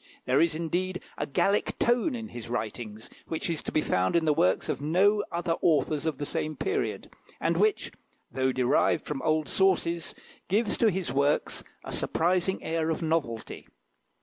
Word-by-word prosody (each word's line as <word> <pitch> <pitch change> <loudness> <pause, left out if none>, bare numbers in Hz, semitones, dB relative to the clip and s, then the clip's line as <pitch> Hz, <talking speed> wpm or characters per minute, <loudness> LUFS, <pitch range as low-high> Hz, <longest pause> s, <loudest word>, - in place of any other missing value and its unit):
There 130 +2 +3
is, 165 -1 +2
indeed, 180 +3 -2
a - - -3
Gallic 200 +8 +1
tone 240 +4 +2
in 225 -2 -6
his 120 -1 -8
writings, 110 -2 -4 0.2
which 165 +1 -2
is 160 - -1
to - - -5
be 155 - +2
found 90 - +1
in 170 -1 +3
the 155 - +4
works 95 -9 +2
of 140 - -2
no 195 +7 +3
other 170 0 -2
authors 155 -1 +2
of 155 -4 -1
the 145 - -3
same 155 +2 -2
period, 400 +1 -2 0.3
and - - +1
which, 430 -2 +1 0.4
though 130 0 +1
derived 130 -1 +2
from 150 -3 -3
old 155 -1 +1
sources, 170 -3 +1 0.3
gives 210 +2 +2
to 225 - +5
his 180 -9 -2
works 140 +2 +1 0.2
a - - -6
surprising 180 +3 +1
air 160 0 -1
of 160 +1 -1
novelty. 155 -9 -2
160 Hz, 175 wpm, -28 LUFS, 140-185 Hz, 0.4 s, to